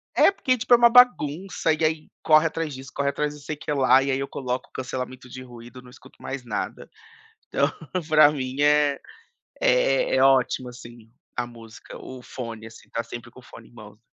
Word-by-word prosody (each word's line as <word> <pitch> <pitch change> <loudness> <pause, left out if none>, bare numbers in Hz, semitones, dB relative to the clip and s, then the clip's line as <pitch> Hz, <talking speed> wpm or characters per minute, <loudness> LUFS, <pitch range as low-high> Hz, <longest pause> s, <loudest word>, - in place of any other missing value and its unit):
é - - +6
porque 255 -9 0
tipo 245 +2 -7
é - - +9
uma 235 0 +6
bagunça 190 - +3
e 160 +1 -3
aí 155 0 0 0.2
corre 155 +1 +5
atrás 160 -2 -4
disso, 130 0 -10
corre 140 0 0
atrás 150 +1 -2
de 145 - -14
sei 155 - -5
que 150 - -6
lá. 135 -1 +4
E 135 - -1
aí 130 - 0
eu 140 - -3
coloco 125 -1 -4
o - - -50
cancelamento 130 0 -6
de 130 +1 -9
ruído, 120 0 -12
não 125 - -16
escuto 125 - -18
mais 135 -2 -6
nada. 115 - -5 0.6
Então, - - +1 0.4
pra 155 -2 +6
mim 135 -1 -4
é 145 -1 +3 0.6
é 130 +2 +2
é 130 - +3
ótimo 130 -1 +3
assim 120 -2 -13 0.3
a 120 -1 -1
música, 115 -2 -13
o 130 -1 -10
fone 115 -3 -8
assim 115 - -15
tá 115 - -2
sempre 120 +1 -9
com 130 - -15
o - - -22
fone - - -14
em - - -25
mãos. 105 -2 -14
130 Hz, 210 wpm, -24 LUFS, 125-150 Hz, 0.6 s, é